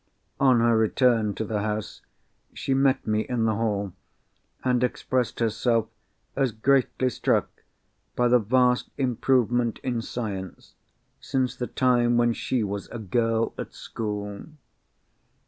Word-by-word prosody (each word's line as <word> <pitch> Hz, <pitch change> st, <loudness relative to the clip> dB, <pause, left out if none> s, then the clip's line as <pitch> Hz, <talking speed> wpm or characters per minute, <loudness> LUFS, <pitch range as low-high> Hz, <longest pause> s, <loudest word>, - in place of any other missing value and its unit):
On 130 Hz, -4 st, +4 dB
her 115 Hz, 0 st, +4 dB
return 110 Hz, -1 st, +2 dB
to 110 Hz, -, -3 dB
the 105 Hz, -1 st, -2 dB
house, 105 Hz, 0 st, -4 dB, 0.5 s
she 135 Hz, -, -1 dB
met 135 Hz, 0 st, +2 dB
me 110 Hz, -1 st, +1 dB
in 115 Hz, 0 st, -1 dB
the 110 Hz, -, +2 dB
hall, 100 Hz, -3 st, -1 dB, 0.7 s
and 125 Hz, -1 st, +2 dB
expressed 125 Hz, 0 st, -1 dB
herself 115 Hz, 0 st, +1 dB, 0.5 s
as 135 Hz, -3 st, +1 dB
greatly 130 Hz, +3 st, +1 dB
struck 125 Hz, -, -1 dB, 0.5 s
by 125 Hz, -, +2 dB
the 125 Hz, 0 st, +5 dB
vast 125 Hz, +3 st, +2 dB
improvement 120 Hz, -2 st, +1 dB
in 120 Hz, -3 st, -1 dB
Science, 100 Hz, -6 st, -6 dB, 0.5 s
since 130 Hz, -2 st, -1 dB
the 125 Hz, -, -4 dB
time 120 Hz, -2 st, +2 dB
when 120 Hz, 0 st, +3 dB
she 120 Hz, 0 st, -1 dB
was 100 Hz, -1 st, -4 dB
a -, -, -6 dB
girl 115 Hz, +2 st, 0 dB
at -, -, -6 dB
school. 105 Hz, -2 st, -5 dB
120 Hz, 130 wpm, -25 LUFS, 110-125 Hz, 0.7 s, the